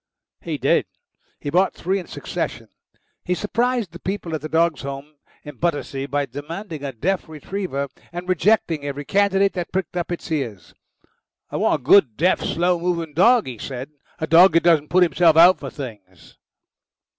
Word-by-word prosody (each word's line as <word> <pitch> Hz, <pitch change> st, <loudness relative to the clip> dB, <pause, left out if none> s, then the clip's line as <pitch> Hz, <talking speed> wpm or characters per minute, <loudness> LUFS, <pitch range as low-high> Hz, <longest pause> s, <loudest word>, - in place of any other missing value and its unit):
He -, -, -4 dB
did. -, -, +2 dB, 0.5 s
He 145 Hz, -, -5 dB
bought 185 Hz, +4 st, +2 dB
three 190 Hz, +3 st, -1 dB
in 180 Hz, -, -9 dB
succession. -, -, -5 dB, 0.5 s
He 180 Hz, -, -1 dB
surprised 230 Hz, +1 st, -1 dB
the 175 Hz, -, -10 dB
people 185 Hz, -4 st, -4 dB
at 155 Hz, -, -2 dB
the 155 Hz, -, -6 dB
Dogs' 165 Hz, -1 st, +1 dB
Home 140 Hz, +2 st, -7 dB, 0.3 s
in 145 Hz, -3 st, -10 dB
Battersea 145 Hz, -5 st, -2 dB
by 145 Hz, 0 st, -1 dB
demanding 150 Hz, -, -7 dB
a 140 Hz, -, -3 dB
deaf 175 Hz, -, -2 dB
retriever, 155 Hz, -2 st, -4 dB, 0.2 s
and 175 Hz, +1 st, -6 dB
rejecting 185 Hz, -4 st, +1 dB
every 145 Hz, 0 st, -5 dB
candidate 200 Hz, +1 st, +2 dB
that 175 Hz, -2 st, -4 dB
pricked 185 Hz, -2 st, -3 dB
up 175 Hz, 0 st, -3 dB
its 175 Hz, 0 st, -5 dB
ears. 120 Hz, -, -4 dB, 0.8 s
"I -, -, -3 dB
want -, -, +1 dB
a -, -, -23 dB
good, 140 Hz, -, +5 dB
deaf, 180 Hz, +5 st, +2 dB
slow 175 Hz, +1 st, 0 dB
moving 170 Hz, -3 st, -2 dB
dog," 230 Hz, -, +4 dB
he 125 Hz, -4 st, -7 dB
said. 130 Hz, +4 st, -6 dB, 0.3 s
"A 160 Hz, -, -2 dB
dog 170 Hz, +3 st, +6 dB
that 165 Hz, -, +3 dB
doesn't 160 Hz, -4 st, +3 dB
put 180 Hz, +1 st, +5 dB
himself 170 Hz, -2 st, +3 dB
out 175 Hz, +3 st, +7 dB
for 135 Hz, -, -6 dB
things." 105 Hz, -, -10 dB
165 Hz, 175 wpm, -22 LUFS, 145-185 Hz, 0.8 s, out